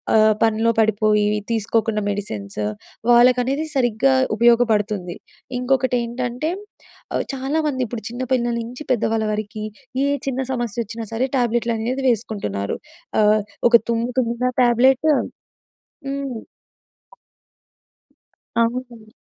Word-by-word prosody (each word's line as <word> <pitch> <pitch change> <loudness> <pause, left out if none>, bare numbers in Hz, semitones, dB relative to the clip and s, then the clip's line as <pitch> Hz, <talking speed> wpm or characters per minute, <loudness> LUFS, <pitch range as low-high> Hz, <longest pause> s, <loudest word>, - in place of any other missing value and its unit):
ఆహ్, 215 0 +6
పనిలో 225 +1 +2
పడిపోయి, 215 -1 +2 0.3
తీసుకోకుండా 220 0 0
మెడిసిన్స్. 105 - -4 0.5
వాళ్ళకనేది 250 +4 +4
సరిగ్గా 250 +1 +2 0.2
ఉపయోగపడుతుంది. 215 -6 +2 0.4
ఇంకొకటి 260 0 +1
ఏంటంటే 245 +5 -3 0.6
ఆహ్, - - 0
చాలామంది 275 +1 -1
ఇప్పుడు 230 0 -6
చిన్న 240 +2 -6
పిల్లల 240 -2 +1
నుంచి 245 +5 -7
పెద్దవాళ్ళ 225 -2 +1
వరకి, 215 0 -4 0.4
ఏ - - +2 0.2
చిన్న 265 -1 -1
సమస్య 240 -4 -3
వచ్చినా 230 +2 -7
సరే 230 +3 0
ట్యాబ్లెట్‍లు 240 -1 +1
అనేవి 250 +5 -2
వేసుకుంటున్నారు. 195 - -2 0.4
ఆహ్, 210 0 +4 0.3
ఒక 235 -1 +7
తుమ్ము 235 +1 0
తుమ్మినా 245 +1 0
టాబ్లెట్టు 260 +5 +4 0.9
హ్మ్. 275 -3 -3 2.2
అవునండి. 235 -2 -3
235 Hz, 105 wpm, -21 LUFS, 215-250 Hz, 2.2 s, ఒక